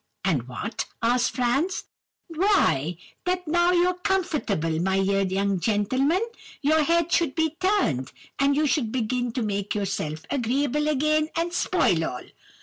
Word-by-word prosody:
"'And 140 Hz, -11 st, 0 dB
what?' 215 Hz, -, -4 dB, 0.2 s
asked 245 Hz, +1 st, +3 dB
Franz. 275 Hz, +9 st, 0 dB, 0.4 s
"'Why, 320 Hz, -, +2 dB, 0.3 s
that 360 Hz, -1 st, -1 dB
now 345 Hz, +2 st, +3 dB
you're 360 Hz, 0 st, +3 dB
comfortable, 230 Hz, -, 0 dB
my 190 Hz, +1 st, +1 dB
dear 195 Hz, +1 st, +1 dB
young 195 Hz, 0 st, 0 dB
gentleman, 260 Hz, -, +1 dB, 0.4 s
your 310 Hz, +2 st, +3 dB
head 335 Hz, +2 st, +1 dB
should 325 Hz, -6 st, +2 dB
be 320 Hz, -1 st, 0 dB
turned, 370 Hz, -, +1 dB, 0.3 s
and 275 Hz, 0 st, +3 dB
you 305 Hz, +1 st, +2 dB
should 265 Hz, -6 st, 0 dB
begin 245 Hz, 0 st, -1 dB
to 245 Hz, -, -1 dB
make 200 Hz, -1 st, -2 dB
yourself 180 Hz, -6 st, -3 dB
agreeable 280 Hz, +3 st, 0 dB
again, 305 Hz, +1 st, +1 dB
and 340 Hz, +1 st, -1 dB
spoil 340 Hz, -, +2 dB
all. 125 Hz, -5 st, -4 dB
260 Hz, 145 wpm, -25 LUFS, 200-330 Hz, 0.4 s, asked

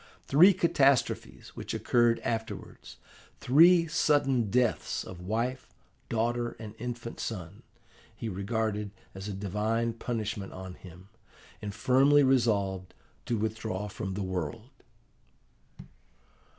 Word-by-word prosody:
Three 175 Hz, +8 st, +7 dB
catastrophes 140 Hz, -7 st, +1 dB
which -, -, -6 dB
occurred 120 Hz, -1 st, +2 dB
afterwards, 110 Hz, -1 st, -5 dB, 0.4 s
three 165 Hz, +6 st, +6 dB
sudden 140 Hz, -, +2 dB
deaths 125 Hz, +2 st, 0 dB
of 90 Hz, -1 st, -10 dB
wife, 120 Hz, +5 st, -2 dB, 0.3 s
daughter, 120 Hz, +1 st, -1 dB
and 110 Hz, -2 st, -8 dB
infant 120 Hz, 0 st, -6 dB
son, 95 Hz, -3 st, -6 dB, 0.5 s
he 115 Hz, -, -5 dB
regarded 105 Hz, +1 st, -2 dB, 0.2 s
as 95 Hz, +1 st, -7 dB
a -, -, -4 dB
divine 105 Hz, +4 st, -1 dB
punishment 110 Hz, -4 st, -4 dB
on 95 Hz, -1 st, -8 dB
him, 90 Hz, +1 st, -14 dB, 0.5 s
and 105 Hz, -, -4 dB
firmly 135 Hz, +6 st, +4 dB
resolved 100 Hz, -8 st, +1 dB, 0.3 s
to 120 Hz, -, 0 dB
withdraw 110 Hz, -2 st, -3 dB
from 95 Hz, -1 st, -5 dB
the 100 Hz, -, -2 dB
world. 90 Hz, -5 st, -4 dB
110 Hz, 110 wpm, -29 LUFS, 100-125 Hz, 0.5 s, Three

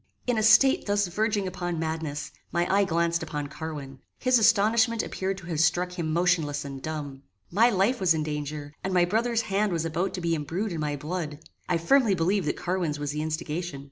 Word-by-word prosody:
In 245 Hz, -, +1 dB
a 220 Hz, -, +1 dB
state 220 Hz, +5 st, +5 dB
thus 205 Hz, 0 st, +2 dB
verging 205 Hz, +2 st, 0 dB
upon 175 Hz, -2 st, -3 dB
madness, 160 Hz, -3 st, -3 dB, 0.2 s
my 175 Hz, +1 st, +1 dB
eye 200 Hz, 0 st, +4 dB
glanced 170 Hz, -1 st, +1 dB
upon 150 Hz, -2 st, -4 dB
Carwin. 140 Hz, -2 st, -7 dB, 0.2 s
His 255 Hz, -1 st, +3 dB
astonishment 225 Hz, +1 st, +3 dB
appeared 190 Hz, 0 st, -3 dB
to 190 Hz, -, -10 dB
have 165 Hz, -3 st, -3 dB
struck 175 Hz, +3 st, +2 dB
him 170 Hz, -3 st, -3 dB
motionless 165 Hz, -4 st, +1 dB
and 135 Hz, -1 st, -7 dB
dumb. 145 Hz, -3 st, -5 dB, 0.3 s
My 225 Hz, +7 st, +5 dB
life 220 Hz, +4 st, +1 dB
was 180 Hz, -4 st, +3 dB
in 155 Hz, -, -1 dB
danger, 150 Hz, -1 st, -5 dB
and 190 Hz, -1 st, -1 dB
my 175 Hz, -1 st, +5 dB
brother's 225 Hz, +5 st, +1 dB
hand 205 Hz, 0 st, 0 dB
was 165 Hz, -2 st, -1 dB
about 170 Hz, +4 st, -1 dB
to 180 Hz, -, -5 dB
be 170 Hz, -1 st, 0 dB
embrued 170 Hz, +7 st, -2 dB
in 165 Hz, -, -4 dB
my 150 Hz, -1 st, -1 dB
blood. 155 Hz, 0 st, -4 dB, 0.3 s
I 175 Hz, -, +2 dB
firmly 220 Hz, +4 st, +3 dB
believed 180 Hz, +1 st, +1 dB
that -, -, -1 dB
Carwin's 175 Hz, -4 st, -1 dB
was 145 Hz, -1 st, -3 dB
the 150 Hz, +1 st, -3 dB
instigation. 160 Hz, 0 st, -3 dB
170 Hz, 205 wpm, -27 LUFS, 155-200 Hz, 0.3 s, state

